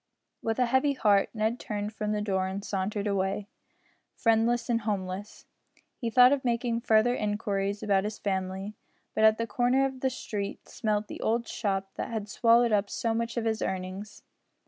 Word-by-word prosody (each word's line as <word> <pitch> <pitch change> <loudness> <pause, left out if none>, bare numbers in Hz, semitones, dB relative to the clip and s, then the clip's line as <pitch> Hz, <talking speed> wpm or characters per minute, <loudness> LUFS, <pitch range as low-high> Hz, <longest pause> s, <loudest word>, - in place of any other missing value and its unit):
With 225 -1 -1
a 250 - +3
heavy 260 +4 +2
heart 205 -6 +3
Ned 220 +2 -1
turned 210 0 -4
from 210 0 -2
the 210 0 -1
door 190 -2 0
and 195 +2 -5
sauntered 200 +1 -2
away, 195 0 0 0.7
friendless 230 +1 +2
and 230 -1 +1
homeless. 200 -1 -4 0.5
He 235 - -3
thought 250 +2 +7
of 280 -2 +1
making 235 -1 0
further 225 +1 +4
inquiries 205 -2 -1
about 195 -1 +2
his 210 0 -4
family, 190 +1 -3 0.4
but 215 - +1
at 220 0 +6
the 230 - -1
corner 250 +3 +2
of 265 -1 -4
the 265 - +1
street 205 -5 -5
smelt 215 -3 -1
the - - -8
old 230 +1 0
shop 195 -2 -2
that - - -3
had 215 -3 -4
swallowed 235 +2 +4
up 200 -1 +2
so 230 -1 -1
much 230 +1 -2
of 230 - -1
his 220 -1 0
earnings. 190 +2 -4
215 Hz, 180 wpm, -28 LUFS, 200-235 Hz, 0.7 s, thought